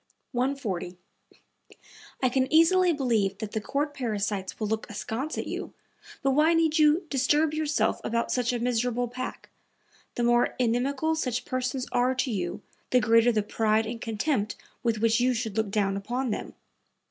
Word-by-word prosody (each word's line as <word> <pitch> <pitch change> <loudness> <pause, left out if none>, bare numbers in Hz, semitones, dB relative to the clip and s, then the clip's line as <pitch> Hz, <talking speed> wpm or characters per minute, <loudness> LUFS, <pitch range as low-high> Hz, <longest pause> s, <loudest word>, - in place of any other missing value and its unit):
140. 240 -9 -2 1.3
"I 255 - +4
can 260 +1 0
easily 345 +3 +5
believe 235 - 0
that 215 -3 -5
the 220 - -2
court 290 +6 -2
parasites 210 -6 -3
will 215 - -1
look 220 +1 -2
askance 235 +8 -4
at - - -2
you, - - -5 0.5
but 270 - +3
why 310 +5 +4
need 320 -1 +2
you 305 +4 +4
disturb 295 +3 +2
yourself 310 -1 0
about 235 0 -1
such 245 -1 +1
a 245 - -1
miserable 245 0 0
pack? 255 +2 -7 0.6
The 240 - -1
more 240 0 +3
inimical 260 +6 +1
such 250 -6 -2
persons 255 0 -2
are 250 +1 +2
to 255 0 -1
you 180 -5 -3 0.3
the 250 - +4
greater 230 +1 +4
the 215 -2 +1
pride 220 +1 +1
and 230 +1 -6
contempt 220 0 -1 0.3
with 230 -2 0
which 230 0 +3
you 250 +1 +2
should 225 -3 -3
look 220 -2 0
down 195 -1 0
upon 245 +5 -2
them." - - -5
245 Hz, 165 wpm, -27 LUFS, 220-275 Hz, 1.3 s, easily